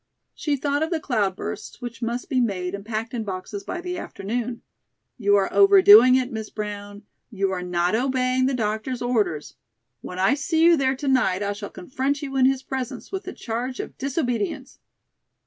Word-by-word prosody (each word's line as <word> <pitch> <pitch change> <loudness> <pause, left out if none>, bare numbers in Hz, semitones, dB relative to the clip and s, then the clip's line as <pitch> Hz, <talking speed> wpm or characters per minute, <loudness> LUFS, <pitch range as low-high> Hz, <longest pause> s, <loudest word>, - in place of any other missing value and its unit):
She 295 -2 -1
thought 285 +1 -1
of 320 - 0
the 335 -2 -1
"cloud 210 -10 0
bursts," 205 - -6
which 240 -1 -7
must 235 +1 -3
be 265 -4 +1
made 185 -5 -1
and 200 0 -5
packed 225 +2 -4
in 235 -2 -2
boxes 200 0 -6
by 350 - -5
the 360 -1 -4
afternoon. 235 - -4 0.6
"You 205 -2 +4
are 195 -1 +1
overdoing 395 -8 +8
it, 260 0 0
Miss 220 -2 -5
Brown. 205 -1 -6 0.3
You 195 -4 -1
are 185 -1 -2
not 180 0 0
obeying 255 +1 +1
the 270 - 0
doctor's 220 +2 -2
orders. 210 -11 -1 0.5
When 180 - -8
I 190 +5 +3
see 320 +3 +1
you 340 0 +7
there 270 -3 +1
to 280 +2 -5
night 210 -8 +2
I 200 0 -1
shall 205 0 -7
confront 265 +8 -3
you 270 -1 -5
in 260 -1 +5
his 265 0 0
presence 260 -2 -5
with 385 0 -4
the 375 - -6
charge 245 +2 -4
of - - -6
disobedience." 250 -6 -2
245 Hz, 190 wpm, -24 LUFS, 205-270 Hz, 0.6 s, overdoing